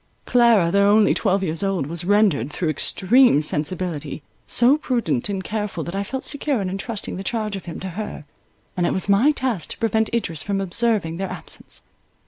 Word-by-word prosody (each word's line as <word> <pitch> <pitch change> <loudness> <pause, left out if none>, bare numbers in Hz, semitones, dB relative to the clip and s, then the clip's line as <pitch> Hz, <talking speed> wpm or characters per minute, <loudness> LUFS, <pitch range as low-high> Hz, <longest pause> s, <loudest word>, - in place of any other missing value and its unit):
Clara, 235 -8 +4
though 200 +1 +4
only 210 +1 +5
twelve 195 -2 0
years 160 -3 -2
old, 195 -7 -1
was 165 +3 -3
rendered, 195 - +2
through 160 +2 -2
extreme 210 - +4
sensibility, 155 -1 -3 0.2
so 245 +4 +5
prudent 235 - -1
and 195 -2 -3
careful, 205 -6 -3
that 170 - -6
I 195 - -1
felt 265 +6 -5
secure 285 -3 -1
in 190 -2 -3
entrusting 200 +1 -4
the 190 - -5
charge 215 -1 -2
of 195 - -8
him 170 - -7
to 190 - -4
her, 190 -4 -6 0.5
and 175 -1 +1
it - - 0
was 190 - -1
my 205 +8 +4
task 255 - -2
to - - -5
prevent 220 -1 0
Idris 165 -10 -2
from 200 +3 -2
observing 195 -3 0
their 195 +1 -3
absence. - - -6
195 Hz, 190 wpm, -22 LUFS, 170-225 Hz, 0.5 s, only